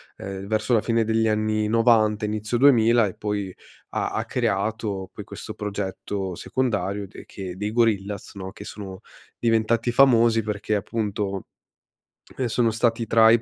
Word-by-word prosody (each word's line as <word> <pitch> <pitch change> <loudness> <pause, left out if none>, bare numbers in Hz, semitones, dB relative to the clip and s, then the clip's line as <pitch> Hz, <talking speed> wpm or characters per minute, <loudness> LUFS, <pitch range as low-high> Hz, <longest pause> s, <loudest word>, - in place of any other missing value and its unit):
uhm, 95 0 -7
verso 110 +2 -1
la 110 - +5
fine 115 -1 +1
degli 110 0 +1
anni 110 0 +1
'90 110 -2 +3
inizio 105 +2 -1
2000, 120 -4 +5
e 95 - -7
poi, 100 -3 -3 0.4
ha - - -2
ha - - -1
creato, 100 -1 -2
poi, - - -9
questo - - -8
progetto 100 -2 -4
secondario 105 -4 -1
de 95 - -12
che 95 -2 -7
dei 105 +2 -3
Gorillaz, 105 -4 0
no, 95 -1 -7
che - - -10
sono 95 -1 -8 0.4
diventati 115 +1 +1
famosi 120 -3 +5
perché 105 0 -2
appunto, 100 -1 -2 0.9
ehm, 130 - 0
sono 115 0 +2
stati 115 0 +1
tra 110 0 +6
i 115 -1 +4
110 Hz, 150 wpm, -24 LUFS, 100-115 Hz, 0.9 s, tra